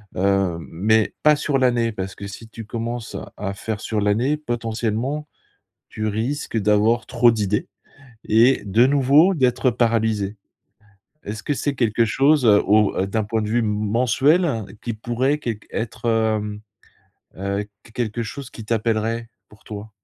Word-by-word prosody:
Heu, 95 -2 +1
mais 110 +6 +2
pas 150 0 +6
sur 145 -1 0
l'année 120 -3 +2
parce 95 -2 -5
que 100 - -8
si 105 +3 -10
tu 115 0 -9
commences, 115 +1 -5 0.2
à 100 -1 -3
faire 105 +1 -4
sur 110 -2 -2
l'année, 115 +9 +1
potentiellement, 120 +2 -2 0.6
tu 110 0 -3
risques 115 +4 -2
d'avoir 105 +2 +2
trop 120 +1 +4
d'idées 105 -2 -1 0.6
et 115 +5 +4
de 110 +5 +4
nouveau 145 +6 +5
d'être 130 -3 +2
paralysé. 110 -3 0 0.9
Est-ce 105 +1 -6
que 145 - 0
c'est 145 0 -2
quelque 115 -2 +2
chose, 135 +4 +3
heu, 105 -2 +6
au 105 -1 +3
d'un 110 +2 -1
point 110 +2 -1
de 105 - -3
vue 120 +2 +2
m 115 - 0
mensuel 120 - +2 0.2
qui 120 - -3
pourrait 120 +6 0
qu 120 - -2 0.2
être, 115 +1 -5
hem, 110 -2 0 0.8
heu, 100 +2 -2 0.2
qu 110 - -17
quelque 115 -1 -2
chose 135 +3 -7
qui 115 - -10
t'appellerait, 115 +1 -1 0.2
pour 105 - -20
toi? 105 0 -8
115 Hz, 155 wpm, -22 LUFS, 105-125 Hz, 0.9 s, pas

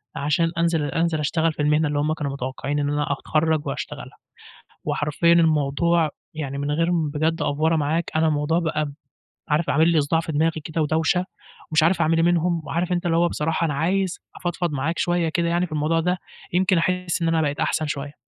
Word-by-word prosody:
عشان 150 +3 +1
أنزل 165 -2 +1
أنزل 165 +3 0
اشتغل 160 +2 +1
في 150 - -4
المهنة 150 +1 +2
اللي 145 0 -1
هُم 150 +2 +1
كانوا 145 -3 -3
متوقعين 140 +2 -3
إن 145 0 0
أنا 145 0 -1
أتخَرّج 155 +2 0
وأشتغلها، - - -6 0.7
وحرفيًا 150 +3 +2
الموضوع 160 0 +2 0.2
يعني 140 -3 -4
من 145 +1 -2
غير 165 +3 +1
م 165 -4 +1
بجد 160 +3 -1
أفوَرَة 155 +3 +1
معاك 155 +2 0
أنا 160 0 +3
الموضوع 155 +2 +1
بقى، 155 -3 -1 0.6
عارف 155 +3 +1
عامِل 160 +1 +4
لي 165 -2 +4
صُداع 155 +3 +1
في 160 -1 -5
دماغي 160 +1 +1
كده 160 0 -1
ودوشة، 160 +4 +1 0.5
ومش 155 0 +3
عارف 170 +3 +3
أعمل 165 0 +3
إيه 165 - +3
منهم، 175 -1 +1
وعارف 175 +3 -2
أنت 175 0 -1
اللي 165 - +2
هو 175 +1 +3
بصراحة 160 +1 -1
أنا 150 -3 0
عايز 185 +5 0 0.2
أفضفض 175 -2 -2
معاك 145 +4 -2
شوية 175 -1 +1
كده 170 +1 0
يعني 175 +1 +1
في 165 - -16
الموضوع 155 +2 +1
ده، 180 +2 0 0.3
يمكن 185 0 +3
أحِس 180 0 -1
إن 165 - +2
أنا 165 -1 +2
بقيت 145 -1 -1
أحسن 155 - 0
شوية. 145 0 -5
160 Hz, 200 wpm, -23 LUFS, 150-170 Hz, 0.7 s, عامِل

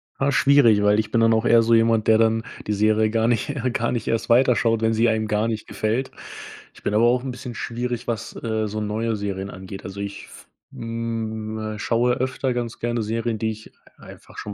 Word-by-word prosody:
Ah, 135 +1 0
schwierig, 135 -6 +5
weil 105 +1 +3
ich 110 - -2
bin 115 - +2
dann 115 0 +4
auch 110 +1 +1
eher 115 -1 +6
so 115 0 +3
jemand, 115 -1 +2
der 110 - +6
dann 110 0 +2 0.2
die 105 - -1
Serie 110 +1 +2
gar 115 0 +1
nicht 120 +5 0 0.2
gar 120 +2 0
nicht 120 -3 -3
erst 115 - -1
weiter 125 +1 +5
schaut, 115 -1 +1
wenn 110 0 +2
sie 115 +1 +3
einem 110 -1 0
gar 105 +1 0
nicht 110 -2 -4
gefällt. 115 +5 -2 0.6
Ich - - -17
bin - - -2
aber 110 - +4
auch 125 +1 +2
'n 135 - -4
bisschen 125 0 -8
schwierig, 120 +1 -4
was, 115 -2 -4
äh, 110 -2 -1
so 110 +1 -4
neue 110 +2 -1
Serien 100 -1 -4
angeht. 95 +1 -9
Also 95 +1 -7
ich 100 0 -6
f - - -15 0.3
hm, 115 -1 -4 0.2
äh, - - -9
schaue 120 +3 +1
öfter 130 0 -1
ganz 120 -2 -4
gerne 120 -1 -1
Serien, 115 +1 -2
die 110 +1 -1
ich 110 0 -11 0.3
einfach - - -14
schon 105 - -6
115 Hz, 225 wpm, -23 LUFS, 110-120 Hz, 0.6 s, eher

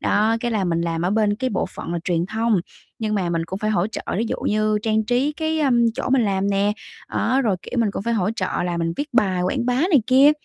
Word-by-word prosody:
Đó, 220 +2 +2
cái 240 - -1
là 210 -4 0
mình 170 -1 0
làm 165 -1 -2
ở 180 - +1
bên 210 -1 +2
cái 255 +2 -2
bộ 195 - -1
phận - - -7
là 175 - -1
truyền 175 -1 0
thông, 220 -2 +1 0.4
nhưng 215 -1 -1
mà 180 -4 0
mình 165 -1 -1
cũng 190 +3 -5
phải 215 +1 -1
hỗ 195 -2 +1
trợ 220 - -6 0.2
ví 230 - +1
dụ - - -2
như 215 0 +1
trang 220 -1 +1
trí 250 +6 +1
cái, 315 0 -1
ơ, 280 - +2 0.2
chỗ - - -3
mình 265 -3 +4
làm 195 0 0
nè, 200 +1 +2 0.4
đó 265 +2 +1
rồi, 210 -6 +1
kiểu, 245 - -4
mình 220 -3 +2
cũng - - -4
phải 235 +2 0
hỗ 200 -1 +1
trợ - - -1 0.2
là 175 -1 -2
mình 165 0 -1
viết 295 +1 -3
bài 190 -7 +2
quảng 240 +7 -1
bá 250 - +2
này 310 - +3
kia. 270 +3 +6
215 Hz, 270 wpm, -22 LUFS, 185-245 Hz, 0.4 s, kia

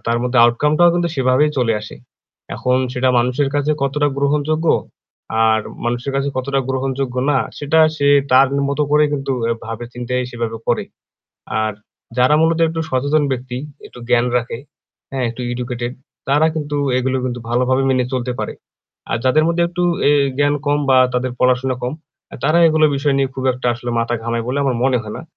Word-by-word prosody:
তার 115 0 +1
মধ্যে 125 0 +1
আউটকামটাও 150 +8 +3
কিন্তু 175 0 0
সেভাবেই 130 +3 +3
চলে 120 -3 +2
আসে। 105 - -10 0.6
এখন 125 0 0 0.2
সেটা 130 0 +1
মানুষের 125 +4 +1
কাছে 145 +1 +1
কতটা 145 +2 +1
গ্রহণযোগ্য, 150 +3 0 0.8
আর 110 0 +3 0.2
মানুষের 120 +3 -2
কাছে 140 +1 0
কতটা 135 +1 0
গ্রহণযোগ্য 130 -1 -2 0.2
না, 135 - +3 0.2
সেটা 150 +2 +1 0.2
সে 140 -1 +1 0.2
তার 130 +1 +6 0.2
মতো 140 +1 0
করে 150 0 +4
কিন্তু 135 -1 -2 0.3
ভাবে 115 +2 -6
চিন্তায় 125 +1 -2
সেভাবে 115 -2 -4
করে। - - +1 0.8
আর 110 0 -1 0.5
যারা 130 +4 +4
মূলত 160 0 +2
একটু 165 0 -3
সচেতন 145 +4 +1
ব্যক্তি 125 0 -5 0.3
একটু - - -15
জ্ঞান 125 0 +3
রাখে। 120 -1 -2 0.5
হ্যাঁ, 130 -2 -2
একটু 120 +2 -9
এডুকেটেড 120 0 -4 0.4
তারা 150 +3 +4
কিন্তু 150 -2 -3 0.2
এগুলো 130 +1 0
কিন্তু 125 -1 -3
ভালোভাবে 125 +2 +1
মেনে 130 -1 +2
চলতে 125 -1 -2
পারে। - - -4 0.6
আর 115 - 0
যাদের 155 +5 +3
মধ্যে 170 0 +1
একটু 175 +1 -3 0.3
এ - - +5 0.3
জ্ঞান 145 0 +3
কম 145 0 +2
বা 130 - +6 0.2
তাদের 125 0 -1
পড়াশোনা 125 0 +2
কম 125 - -2 0.4
এ - - -6
তারা 160 +2 +3
এগুলো 155 0 +3
বিষয় 140 0 +1
নিয়ে 135 - +1
খুব 130 - -5
একটা 125 0 -5
আসলে 120 0 -5
মাথা 115 +1 0
ঘামায় 115 0 -2
বলে 135 - -1
আমার 130 -3 0
মনে 130 -2 +2
হয় 105 0 -7
না। - - -8
130 Hz, 175 wpm, -18 LUFS, 125-145 Hz, 0.8 s, তার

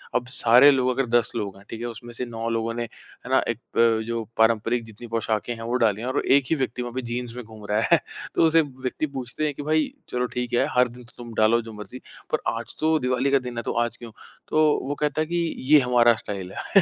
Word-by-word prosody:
अब 125 0 0
सारे 125 +1 +6
लोग 130 -2 +2
अगर 130 +1 0
10 - - -5
लोग 100 -4 -3
हैं, 100 - -16
ठीक 115 - -6
है? - - -3
उसमें 120 +1 -9
से 120 - -4
9 125 - -6 0.2
लोगों 115 0 -1
ने, 120 0 -2
है 120 +1 -13
ना, 130 - +5
एक 115 -1 -2 0.2
प 115 -1 +4
जो 115 -1 -2
पारंपरिक 115 +1 +2
जितनी 110 +2 -11
पोशाकें 115 0 -1
हैं, 115 - -9
वो 120 +2 -2
डाली 105 -1 +2
हैं, 120 - -4
और 130 +2 0
1 140 +1 +5
ही - - +3
व्यक्ति 130 -3 -2
वहाँ 120 -1 -5
पे 130 - -2
जीन्स 120 0 -5
में 125 - -6
घूम 110 -1 -12
रहा 105 +1 +2
है। 170 - +7 0.4
तो - - +5
उसे 160 0 +5
व्यक्ति 130 +1 -4
पूछते 130 +4 -3
हैं, 150 - -1
कि, 145 - -7
"भई 155 +1 +1 0.2
चलो 125 0 -1
ठीक 125 -1 -3
है, 120 - +3
हर 125 0 +5
दिन 125 +1 -13
तो 115 - -20
तुम 120 -1 -9
डालो 115 +2 +4
जो 115 0 -10
मर्ज़ी 105 +4 -9 0.3
पर - - +1
आज 115 0 -6
तो 160 +1 +3
दीवाली 125 +2 0
का 140 - +5
दिन 125 -2 -7
है 115 - -2
तो - - -2
आज 120 -1 -7
क्यों?" 115 -2 -10 0.4
तो 155 0 +3 0.2
वो 145 - -2
कहता 150 +1 0
है 155 - -1
कि, 170 0 -1
"ये 150 +3 +6
हमारा 120 -2 +4
स्टाइल 95 -3 -5
है।" 195 - +4
120 Hz, 260 wpm, -24 LUFS, 115-130 Hz, 0.4 s, है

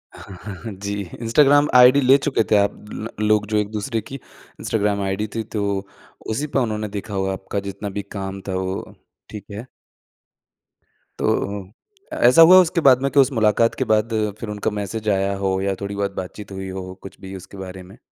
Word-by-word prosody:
हाँ, 95 -2 -11
हाँ, 105 -2 -7
हाँ। 115 - -5
जी, 100 +1 -5 0.3
इंस्टाग्राम 145 +5 +4
आईडी 125 +3 +7
ले 135 +2 +6
चुके 140 -5 0
थे - - +6
आप 100 0 +1 0.2
लो 115 - -5 0.2
लोग 105 -1 +3
जो 110 -1 0
एक 105 -1 0
दूसरे 110 +1 -2
की 135 - -9 0.4
इंस्टाग्राम 105 -2 0
आईडी 95 +2 -2
थी 115 - -1
तो 100 -1 0 0.6
उसी 140 +8 -2
पे 140 - 0
उन्होंने 110 -3 -2
देखा 105 +1 -7
होगा 95 0 -1
आपका 95 +1 -4
जितना 100 +1 -6
भी 100 +1 -4
काम 95 -1 -5
था 95 - -2
वो 95 0 -4 0.4
ठीक 105 -2 -9
है। 110 +5 -7 1.5
तो 100 -1 -1 0.5
अ, - - -4
ऐसा 125 +7 +7
हुआ 180 +3 +9
उसके 170 -1 0
बाद 130 -2 +5
में 140 - +1
के 140 - +3
उस 135 +1 +5
मुलाकात 115 -1 +2
के 130 - -1
बाद 110 +1 +2 0.3
फ़िर 110 - -6
उनका 105 +1 -2
मैसेज 105 +2 -3
आया 100 0 +1
हो 95 -1 0
या 100 0 -1
थोड़ी-बहुत 100 0 -2
बात-चीत 100 +2 -7
हुई 95 0 -6
हो। 95 0 -6
कुछ 95 - -11
भी 95 0 -8
उसके 95 +1 -11
बारे 95 -1 -8
में? 95 +6 -15
105 Hz, 200 wpm, -21 LUFS, 95-115 Hz, 1.5 s, हुआ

